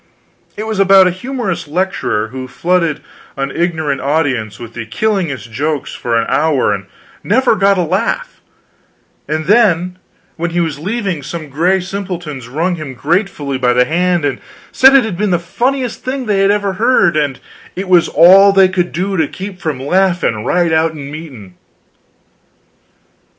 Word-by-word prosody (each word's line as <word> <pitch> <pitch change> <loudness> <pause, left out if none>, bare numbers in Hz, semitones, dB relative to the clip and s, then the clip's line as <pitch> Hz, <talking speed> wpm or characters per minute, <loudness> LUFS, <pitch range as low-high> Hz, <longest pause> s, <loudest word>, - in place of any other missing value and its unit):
It 215 - -4
was 220 -2 -3
about 195 -1 +6
a 180 - +2
humorous 205 - -4
lecturer 150 - -1
who 130 +1 -7
flooded 170 +4 0 0.4
an 135 0 -2
ignorant 160 -5 -1
audience 135 -7 -1
with 115 -1 -9
the 115 -2 -7
killingest 160 - -2
jokes 145 +4 -3
for 115 -1 -1
an 115 - +1
hour 155 -5 +1
and - - -6 0.4
never 255 +6 +2
got 200 -1 +3
a 180 - +1
laugh; 190 - -2 0.9
and 155 0 -2
then 180 -3 +2 0.4
when 170 +1 -2
he 175 +1 -2
was 160 -4 -2
leaving, 195 -2 -3
some 155 +2 -7
gray 175 +7 +1
simpletons 175 -9 -6
wrung 170 +8 -1
him 145 -5 -7
gratefully 150 - -1
by 125 -1 +2
the 125 0 +3
hand 175 0 0
and 140 - -2 0.3
said 265 +1 +6
it 265 -4 +5
had 195 -5 -5
been 210 -1 +1
the 175 - +2
funniest 245 +8 -2
thing 260 0 -3
they 205 -3 +1
had 195 0 +3
ever 200 -1 0
heard, 225 -8 +3
and 145 -4 -1 0.4
"it 190 +1 -4
was 180 -2 +4
all 190 +5 +7
they 195 -1 +5
could 180 -1 -1
do 190 +3 -2
to 160 -3 +1
keep 190 +2 -8
from 150 -5 -3
laughin' 175 - 0
right 175 +3 +1
out 160 0 +2
in 145 -2 -8
meetin'." 135 - -10
175 Hz, 165 wpm, -15 LUFS, 145-195 Hz, 0.9 s, all